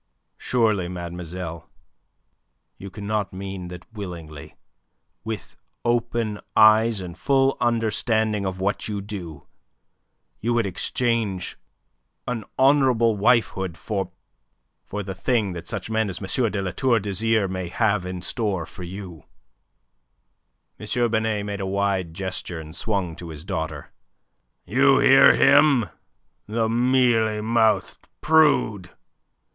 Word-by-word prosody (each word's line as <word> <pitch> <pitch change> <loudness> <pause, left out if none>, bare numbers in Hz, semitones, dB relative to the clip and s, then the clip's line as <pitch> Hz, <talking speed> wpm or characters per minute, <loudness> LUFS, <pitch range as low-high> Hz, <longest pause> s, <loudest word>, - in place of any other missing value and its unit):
"Surely, 110 -7 +1
mademoiselle, 85 -1 -6 1.1
you 100 - -8
cannot 105 +1 -3
mean 95 -1 -6
that 90 0 -9
willingly, 85 -8 -8 0.7
with 110 -2 -6 0.3
open 120 -3 0 0.2
eyes 110 0 +5
and 90 -2 -7
a - - -19
full 135 -1 +2
understanding 110 -2 +1
of 95 -1 -3
what 100 +2 -1
you 105 -2 -3
do, 95 -8 -7 0.9
you 120 +2 0
would 115 -2 +2
exchange 105 0 -1 0.7
an 125 -3 -2
honourable 130 -5 +4
wifehood 100 -5 +1
for... 100 +2 -3 0.8
for 105 0 -4
the 95 0 -5
thing 100 0 0
that 85 - -8
such - - -4
men 110 -1 0
as 95 - -5
M. 110 +4 0
de 100 0 -2
La 95 - -2
Tour 125 0 +2
d'Azyr 105 +1 0
may 95 -1 -4
have 105 -1 +1
in 90 0 -6
store 100 -5 -1
for 95 - -12
you?" 90 -2 -8 1.5
M. 120 -2 0
Binet 110 -2 0
made 100 -1 -4
a 95 - -2
wide 95 -4 -1
gesture, 95 -2 -4
and 80 0 -9
swung 95 -6 -2
to 85 0 -9
his 80 0 -9
daughter. 80 -4 -4 0.7
"You 135 +6 +4
hear 135 +1 +7
him, 140 - +5 0.6
the 110 +1 0
mealy 120 -2 +2
mouthed 110 -3 +1
prude! 145 - +3
105 Hz, 125 wpm, -23 LUFS, 95-115 Hz, 1.5 s, hear